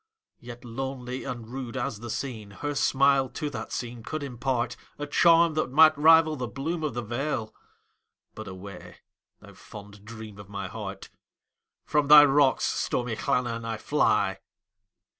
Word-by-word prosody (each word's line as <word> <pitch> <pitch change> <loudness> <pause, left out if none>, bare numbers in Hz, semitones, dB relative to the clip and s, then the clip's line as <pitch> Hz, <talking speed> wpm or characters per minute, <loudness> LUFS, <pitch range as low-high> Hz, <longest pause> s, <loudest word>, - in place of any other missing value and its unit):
Yet 120 0 -11
lonely 130 +1 -5
and 120 -3 -6
rude 130 0 -6
as 120 -4 -3
the 120 +1 -8
scene, 110 -3 -5
Her 145 +10 -5
smile 135 -1 +3
to 150 +2 -5
that 110 -3 -6
scene 120 -1 -5
could 155 +6 -5
impartA 125 -2 -2 0.4
charm 170 -1 +5
that 155 -3 -1
might 155 +3 +6
rival 160 +1 +5
the 125 -4 -4
bloom 155 +9 -4
of 150 -6 -2
the 120 - -3
vale,—But 120 -3 -7
away, 95 +1 -10 0.5
thou - - -14
fond 105 -1 -13
dream 110 -2 -10
of 100 -1 -12
my 100 -1 -5
heart! 100 0 -8 0.7
From 150 -1 +1
thy 150 0 +10
rocks, 140 -1 +3
stormy 120 -2 -1
Llannon, 120 -2 -1
I 115 -1 -4
fly. 105 -6 +1
125 Hz, 145 wpm, -26 LUFS, 110-140 Hz, 0.7 s, thy